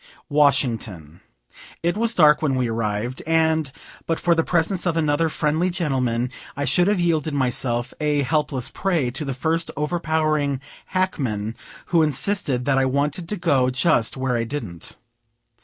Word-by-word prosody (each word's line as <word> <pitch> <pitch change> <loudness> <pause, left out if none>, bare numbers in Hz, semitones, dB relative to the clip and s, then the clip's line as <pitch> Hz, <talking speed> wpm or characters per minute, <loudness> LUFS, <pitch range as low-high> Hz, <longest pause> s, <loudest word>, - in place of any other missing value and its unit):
Washington. 120 - +1 0.6
It 170 +2 +1
was 230 +1 +1
dark 150 -3 +5
when 145 -4 +1
we 130 -1 0
arrived; 115 +2 -2
and, 160 -3 +2 0.4
but 165 - 0
for 175 - +3
the 165 -1 +2
presence 175 +2 0
of 165 -1 0
another 155 +1 +2
friendly 155 +4 0
gentleman, 130 -8 -1 0.3
I 145 - -1
should 180 +4 +3
have 205 -2 +2
yielded 160 -3 0
myself 120 -2 -1
a 150 -2 +1
helpless 135 -2 0
prey 170 -10 0
to 140 +5 -4
the 135 -3 -4
first 160 +5 -1
overpowering 155 -3 0 0.3
hackman, 120 - -1 0.4
who 170 - +6
insisted 145 -3 +1
that 135 -1 +2
I 135 - +2
wanted 145 +5 -1
to 210 - -1
go 135 -7 +2
just 125 -3 +1
where 130 -1 -1
I 115 - 0
didn't. 115 - -5
145 Hz, 155 wpm, -22 LUFS, 125-165 Hz, 0.6 s, who